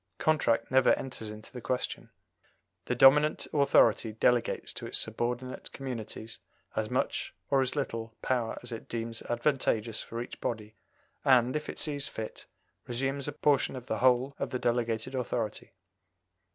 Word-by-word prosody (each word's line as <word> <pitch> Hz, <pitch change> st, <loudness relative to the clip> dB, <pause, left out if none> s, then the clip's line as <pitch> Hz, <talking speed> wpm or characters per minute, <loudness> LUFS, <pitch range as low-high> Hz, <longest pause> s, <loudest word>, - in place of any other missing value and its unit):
Contract 120 Hz, -8 st, +2 dB
never 130 Hz, 0 st, +6 dB
enters 125 Hz, -5 st, -6 dB
into 105 Hz, +1 st, -10 dB
the 125 Hz, -, -7 dB
question. 125 Hz, +2 st, -2 dB, 0.8 s
The 125 Hz, -, -1 dB
dominant 150 Hz, +5 st, +6 dB
authority 115 Hz, -6 st, +4 dB
delegates 120 Hz, +2 st, +1 dB
to -, -, -6 dB
its -, -, +2 dB
subordinate 120 Hz, +3 st, -2 dB
communities 115 Hz, -4 st, -6 dB, 0.4 s
as -, -, -1 dB
much -, -, -1 dB, 0.2 s
or 135 Hz, -1 st, +5 dB
as 130 Hz, +2 st, 0 dB
little 115 Hz, -5 st, -3 dB
power 120 Hz, -3 st, 0 dB
as 120 Hz, -, -5 dB
it 115 Hz, -, -7 dB
deems 115 Hz, -1 st, -3 dB
advantageous 120 Hz, -3 st, 0 dB
for 115 Hz, -, -6 dB
each 120 Hz, -, -7 dB
body, 110 Hz, -2 st, -3 dB, 0.5 s
and, 130 Hz, -1 st, +4 dB
if 150 Hz, -, -3 dB
it -, -, -6 dB
sees 145 Hz, -2 st, -1 dB
fit, 110 Hz, -1 st, -7 dB, 0.4 s
resumes 135 Hz, +3 st, -2 dB
a -, -, -1 dB
portion 140 Hz, -2 st, +2 dB
or -, -, -5 dB
the 110 Hz, -3 st, -3 dB
whole 130 Hz, +2 st, +4 dB
of 140 Hz, -, -2 dB
the 130 Hz, -, -2 dB
delegated 120 Hz, 0 st, 0 dB
authority. 120 Hz, -4 st, -3 dB
125 Hz, 150 wpm, -30 LUFS, 115-135 Hz, 0.8 s, never